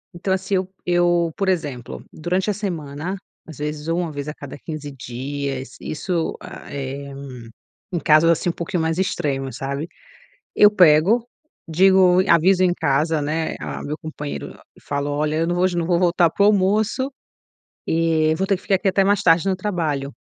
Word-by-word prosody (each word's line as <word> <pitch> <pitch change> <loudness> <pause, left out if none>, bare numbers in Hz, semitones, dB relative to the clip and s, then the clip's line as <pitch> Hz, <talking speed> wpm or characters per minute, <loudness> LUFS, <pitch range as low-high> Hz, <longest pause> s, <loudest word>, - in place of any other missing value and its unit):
Então, 190 +2 -1
assim 190 +1 -1
eu 185 0 0 0.2
eu, 175 -1 +2
por 195 - -1
exemplo, 145 -9 -3
durante 180 +5 -1
a - - +1
semana, 170 -3 -4 0.3
às 160 - -10
vezes 150 +1 -4
ou 165 +1 0
uma 170 -3 -2
vez 145 0 -6
a 150 - -4
cada 145 -1 -9
15 150 -1 -7
dias, 135 +1 -5
isso, 165 +1 -2
hã, - - -9 0.2
é 140 0 -5 0.8
um 175 - 0
caso 155 +2 +5
assim, 170 +1 +2
um - - -1
pouquinho 170 0 -3
mais 160 +2 -1
extremos, 135 -8 -2
sabe. 140 +3 -3 0.7
Eu 210 0 +7
pego, 190 +5 +5 0.4
digo, 185 +1 +5
aviso 180 +3 +5
em 180 -1 +4
casa, 155 0 +1
né, 160 +2 -2
ah, - - -5
meu 150 +2 -4
companheiro 150 -2 -6 0.2
e - - -18
falo: 145 0 -3
"Olha, 150 +1 -1
eu 165 +1 +1
não 175 +1 -1
vou 180 +1 +3
não 170 - 0
vou 175 -1 +2
voltar 175 -2 +3
para 200 - +1
o - - +6
almoço 210 +6 +2 0.8
e 160 -1 +2
vou 190 +3 -1
ter 195 -1 +2
que - - -18
ficar 195 - +1
aqui 195 +1 +1
até 195 +1 +3
mais 200 0 +2
tarde 170 +2 +4
no 190 - +2
trabalho," 160 -8 -2
165 Hz, 185 wpm, -21 LUFS, 150-185 Hz, 0.8 s, Eu